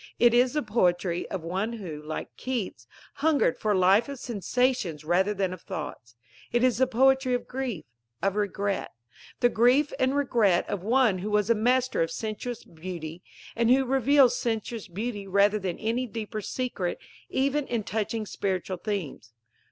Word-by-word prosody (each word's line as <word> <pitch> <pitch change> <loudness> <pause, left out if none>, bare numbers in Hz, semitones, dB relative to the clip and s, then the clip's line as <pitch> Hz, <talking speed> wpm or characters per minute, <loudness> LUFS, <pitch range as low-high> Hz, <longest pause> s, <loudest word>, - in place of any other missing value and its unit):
It 240 -1 +5
is 245 +1 +4
the 300 - 0
poetry, 180 -5 0
of 185 -4 -4
one 190 +7 -2
who, 175 -10 -6
like 155 +1 -6
Keats, 205 - -4 0.3
hungered 290 - +2
for 215 -1 +1
a - - +2
"life 195 +7 +4
of 280 - -5
sensations 235 - -1
rather 185 +5 +2
than 195 -3 -1
of 185 - -9
thoughts." 145 -6 -7 0.4
It 240 +1 +2
is 255 -2 +3
the 260 - +4
poetry 265 +1 +3
of 245 - -4
grief, 250 -11 -4 0.3
of 195 0 0
regret 200 -1 -1 0.5
the 245 - +5
grief 250 +6 +3
and 260 +2 +2
regret 230 -10 +2
of 200 - -3
one 225 -2 +3
who 200 +4 -4
was 210 +1 +2
a - - +7
master 250 +2 +1
of 165 - +1
sensuous 225 +2 -5
beauty, 165 0 -7 0.3
and 235 0 +2
who 265 +2 +5
reveals 270 0 +4
sensuous 225 -1 -3
beauty 205 +2 -4
rather 200 +2 +3
than 185 -3 -3
any 235 +3 -1
deeper 215 -1 -5
secret 205 -5 -3 0.3
even 275 +2 0
in 235 -3 -1
touching 220 +1 -2
spiritual 190 -2 -2
themes. 170 - -5
215 Hz, 165 wpm, -27 LUFS, 185-250 Hz, 0.5 s, a